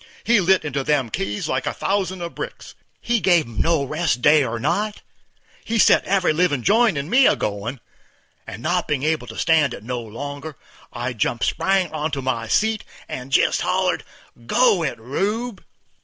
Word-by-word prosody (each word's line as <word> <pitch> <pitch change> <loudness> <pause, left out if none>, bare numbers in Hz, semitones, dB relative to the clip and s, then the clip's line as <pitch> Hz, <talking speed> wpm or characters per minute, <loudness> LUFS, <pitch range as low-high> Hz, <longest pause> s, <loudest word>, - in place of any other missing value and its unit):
He 235 -1 +4
lit 185 -2 +3
into 140 -2 -2
them 140 -5 0
keys 105 +2 -3
like 130 - -2
a - - -2
thousand 190 -2 -1
of 170 - -6
brick; - - -7 0.4
he 235 -1 +1
give 175 -3 +3
'em 115 -2 -4
no 165 -3 +2
rest 150 -1 -1
day 150 0 +6
or 120 -2 -3
night; 205 - -1 0.6
he 230 - -2
set - - +5
every 190 -4 +2
livin' 155 -6 +1
joint 220 -4 +3
in 140 +1 -3
me 255 +8 +5
a - - +4
goin', 105 +6 -4 0.7
and, 110 +5 -8
not 175 +1 0
bein' 145 -3 -1
able 155 -5 0
to 110 - -9
stand 155 -6 +2
it - - -12
no 125 +2 -3
longer, 140 +6 -7 0.3
I 120 +2 -4
jumped 115 0 -1
spang 190 -3 +1
onto 150 -2 -2
my 130 -4 -2
seat, 220 - +1 0.2
and 130 +1 -7
jest - - +3
hollered, - - 0 0.3
_"Go 205 - +2
it, 140 -7 -2
my 110 - -19
Rube!" 205 - -2
150 Hz, 185 wpm, -22 LUFS, 125-190 Hz, 0.7 s, day